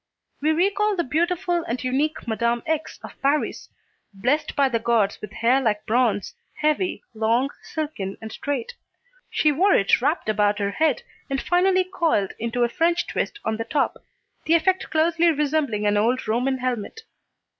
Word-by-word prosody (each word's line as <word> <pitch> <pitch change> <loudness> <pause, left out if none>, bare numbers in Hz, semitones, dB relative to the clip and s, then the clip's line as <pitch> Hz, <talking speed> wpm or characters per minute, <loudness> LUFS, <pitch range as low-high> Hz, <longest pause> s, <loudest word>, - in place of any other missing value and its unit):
We 305 - +2
recall 400 +5 +2
the 345 - 0
beautiful 345 +3 0
and 245 +3 -3
unique 275 +3 -1
Madame 235 +1 0
X. 315 -1 -2
of - - -11
Paris, 285 +2 0 0.5
blessed 255 +10 0
by 280 -2 +4
the 235 -3 0
gods 225 -3 +1
with 210 - -7
hair 245 +5 +2
like 215 -4 0
bronze, 230 -3 +1 0.2
heavy, 305 +5 0
long, 230 +5 +1
silken 290 -12 -5
and 220 0 -8
straight. 440 - -3 0.6
She 305 - +2
wore 375 +8 +3
it 195 +2 +3
wrapped 290 +2 0
about 210 -1 +2
her 200 -1 -1
head 310 +4 +1 0.3
and 270 -1 -1
finally 370 +3 +3
coiled 330 - 0
into 235 +2 -1
a - - +4
French 335 +7 +1
twist 415 - -3
on 220 0 -1
the 225 - -2
top, 275 +5 0 0.5
the 330 - +4
effect 370 +3 +1
closely 330 +2 +3
resembling 290 -8 0
an 205 0 +2
old 240 +5 +1
Roman 250 +4 +1
helmet. 255 - -3
270 Hz, 165 wpm, -23 LUFS, 225-320 Hz, 0.6 s, by